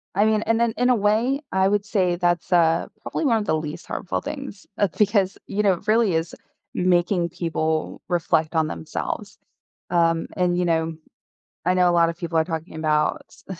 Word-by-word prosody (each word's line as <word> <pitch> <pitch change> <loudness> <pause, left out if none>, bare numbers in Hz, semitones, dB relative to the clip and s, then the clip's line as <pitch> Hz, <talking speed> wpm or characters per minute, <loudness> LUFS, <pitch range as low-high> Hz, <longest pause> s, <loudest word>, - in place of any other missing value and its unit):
I 205 - +4
mean, 215 -1 +2
and 225 0 +2
then 235 -1 +2
in 250 +1 +2
a 250 - +5
way, 225 +7 +1
I 190 0 +3
would 205 +1 +1
say 185 -4 +1
that's, 175 -1 0
uh, 165 -2 +3 0.2
probably 315 - -3
one 235 -4 +3
of 215 - -2
the 160 - +1
least 155 -1 -5
harmful - - -3
things, 275 -8 -7
that's 200 -6 -1
because, 200 -2 +2
you 205 - -1
know, 200 -2 +4
it 180 +4 -9
really 220 -3 +3
is 160 +1 -2 0.4
making 175 0 +1
people 160 -2 -2
reflect 160 -2 +1
on 160 -1 +3
themselves. 80 -1 -5 0.5
Um, 165 -1 +2
and, 180 -1 +1
you 180 - +1
know, 165 -1 0 0.7
I 180 - +3
know 180 -1 +4
a - - +1
lot 165 -1 +4
of 170 - -9
people 170 -2 -3
are 160 - +3
talking 165 0 -5
about, 155 -1 +1
sc - - -20
180 Hz, 200 wpm, -23 LUFS, 165-205 Hz, 0.7 s, a